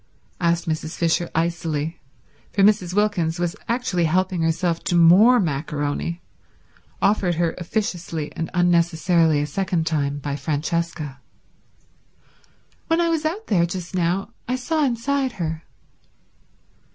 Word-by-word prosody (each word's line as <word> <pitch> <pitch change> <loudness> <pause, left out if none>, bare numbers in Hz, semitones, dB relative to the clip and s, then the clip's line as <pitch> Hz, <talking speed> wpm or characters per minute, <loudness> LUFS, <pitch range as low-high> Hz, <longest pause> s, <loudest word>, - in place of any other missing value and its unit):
asked 170 -1 +1
Mrs. 155 0 -3
Fisher 170 0 +1
icily, 165 -2 -1 0.5
for 200 - +2
Mrs. 190 -3 +3
Wilkins 195 -6 +1
was 175 -1 -1
actually 230 -8 0
helping 180 +2 +1
herself 165 +1 0
to 175 - 0
more 190 +9 +7
maccaroni, 150 0 -2 0.8
offered 195 -4 +2
her 165 0 0
officiously 175 -5 -3
and 165 - -3
unnecessarily 170 -2 +3
a - - 0
second 170 +1 -1
time 145 -3 0
by 145 0 -4
Francesca. 155 -1 -2 1.7
"When 330 +1 +2
I 340 -1 +2
was 320 -2 0
out 380 +8 -2
there 170 -4 +2
just 175 0 -6
now 180 +2 0 0.2
I 250 - 0
saw 305 +5 0
inside 265 +1 0
her." 165 -4 -4
170 Hz, 125 wpm, -22 LUFS, 160-195 Hz, 1.7 s, more